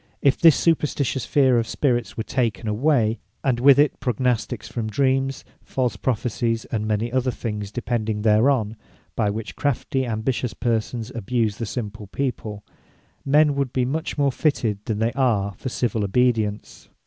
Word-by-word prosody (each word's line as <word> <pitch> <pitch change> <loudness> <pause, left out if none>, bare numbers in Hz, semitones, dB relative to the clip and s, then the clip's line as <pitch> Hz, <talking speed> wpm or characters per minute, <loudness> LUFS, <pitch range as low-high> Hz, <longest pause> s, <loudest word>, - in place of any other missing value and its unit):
If 140 -1 +3
this 165 -3 +8
superstitious 145 -5 0
fear 130 -4 +4
of 115 - -2
Spirits 120 -5 -1
were 110 - -1
taken 115 -5 -1
away, 115 0 +2 0.2
and 125 -4 +1
with 135 +1 +7
it, 145 -1 +3
Prognostiques 125 -3 -1
from 110 -3 -4
Dreams, 135 +3 0 0.2
false 125 -2 -1
Prophecies, 115 -1 -1
and 110 -2 -1
many 110 +2 -1
other 130 0 +1
things 105 -4 -4
depending 110 -3 -2
thereon, 110 0 +3 0.4
by 105 -3 +1
which, 110 +2 -5
crafty 135 -1 -1
ambitious 115 +2 -2
persons 115 0 -2
abuse 115 -1 -1
the 115 - -4
simple 105 -2 -5
people, 105 -2 -4 0.6
men 150 +1 +4
would 140 -2 -1
be 130 -1 +1
much 155 +6 -3
more 140 -1 +2
fitted 120 -8 0
than 110 - -2
they 115 +2 +1
are 110 -7 +1
for 130 +8 -6
civill 115 -3 -1
Obedience. 110 -1 0
120 Hz, 155 wpm, -23 LUFS, 110-135 Hz, 0.6 s, this